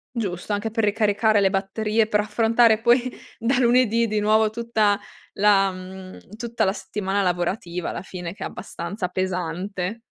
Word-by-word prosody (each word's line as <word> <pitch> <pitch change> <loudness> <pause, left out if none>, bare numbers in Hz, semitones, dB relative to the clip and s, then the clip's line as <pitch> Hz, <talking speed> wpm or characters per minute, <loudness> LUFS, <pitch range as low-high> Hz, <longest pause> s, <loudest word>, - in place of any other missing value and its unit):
Giusto, 200 -3 -3
anche 205 +2 -2
per 225 - 0
ricaricare 210 0 +2
le 195 -1 +3
batterie 210 +3 0
per 210 - +2
affrontare 225 +1 +3
poi 245 +2 +3 0.3
da 245 +3 +1
lunedì 235 -2 +3
di 215 - 0
nuovo 215 +1 +3
tutta 220 -3 +1 0.4
la 195 -1 +4
mhmm, 185 0 -10 0.2
tutta 235 0 -1
la 190 - +2
settimana 200 0 -2
lavorativa 180 0 -2
alla - - -5
fine 180 -2 -7
che - - -12
è - - -2
abbastanza 185 +2 -5
pesante. 185 +3 -3
210 Hz, 155 wpm, -23 LUFS, 190-225 Hz, 0.4 s, la